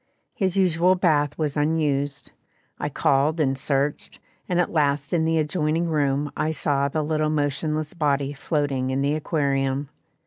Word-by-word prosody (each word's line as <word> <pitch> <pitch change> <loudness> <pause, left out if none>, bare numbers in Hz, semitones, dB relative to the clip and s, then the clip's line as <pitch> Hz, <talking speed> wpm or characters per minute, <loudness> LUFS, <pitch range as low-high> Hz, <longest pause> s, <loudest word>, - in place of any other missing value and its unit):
His 190 -2 -1
usual 180 -1 +3
bath 150 -5 +1
was 150 -3 -1
unused; 145 -2 0 0.5
I - - -2
called 145 +4 +1
and 135 -3 +2
searched, 140 +1 -2 0.3
and 180 -1 +1
at 175 - +1
last 145 -2 0
in 160 -2 +2
the 165 0 +1
adjoining 155 +1 0
room 145 -2 0
I 155 - 0
saw 145 -3 0
the 155 +2 -2
little 155 0 0
motionless 155 +1 -1
body 145 -4 0
floating 140 -3 -1
in 130 +1 0
the 140 +1 +1
aquarium. 140 -3 -1
150 Hz, 150 wpm, -24 LUFS, 140-160 Hz, 0.5 s, usual